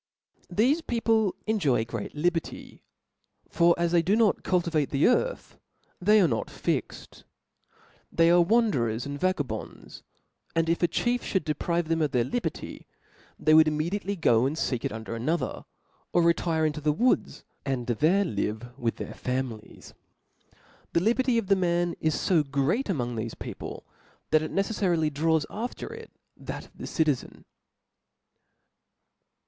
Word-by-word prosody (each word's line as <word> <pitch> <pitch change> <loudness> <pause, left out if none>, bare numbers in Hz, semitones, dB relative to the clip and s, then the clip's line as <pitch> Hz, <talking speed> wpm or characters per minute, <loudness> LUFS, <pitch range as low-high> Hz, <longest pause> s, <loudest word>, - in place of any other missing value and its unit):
npHESE 250 - +2
people 225 -4 +1
enjoy 155 - +1
great 115 +1 -6
liberty. 165 +2 -2 0.7
For 170 0 +4
ts 170 0 0
*• - - -7
they 175 -1 +4
do 190 +5 +2
not 220 -2 +3
cultivate 170 -5 0
the 140 0 +2
earth, - - 0 0.4
they 210 +4 +5
arc 180 -5 +4
not 115 - -2
fixed, - - -4 0.9
they 165 0 +4
are 175 0 +6
wanderers 170 - +1
and 145 0 -5
vagabonds 185 -6 -3
j - - -31 0.5
and 165 0 +1
if 170 - +1
a 175 - +4
chief 240 +8 -1
(hould 190 - +2
deprive 170 +2 -1
them 165 0 0
of 150 -3 0
their 125 -2 +3
liberty, 245 - -4 0.5
they 155 - +3
would 155 0 +7
immediately 175 +7 -1
go 125 - +3
and 145 - -3
feek 125 -6 -2
it - - -1
under 110 +1 -6
another, 155 +9 -2 0.5
or 175 - +4
retire 165 -1 +2
into 150 0 -2
the 150 0 +2
woods, 235 +12 0 0.2
and 130 -3 -2
there 160 - +2
live 110 - -3
with 115 -1 -1
their - - -7
families. 125 -4 -5 1.0
The - - +4
liberty 240 +3 +2
of 230 - 0
the 195 +1 +4
man 175 -2 +1
is 155 -1 0
fo 175 -4 +4
great 145 - 0
among 125 -9 -1
rfieiib 115 0 -5
people, - - -7 0.5
that 155 - +5
it 155 - -4
necefTarily 180 -6 0
draws 160 +1 +1
after 240 - -5
it 455 0 -10 0.3
that - - -7
of - - -23
the - - -6
citizen. 150 -6 -1
165 Hz, 155 wpm, -27 LUFS, 140-195 Hz, 1.0 s, would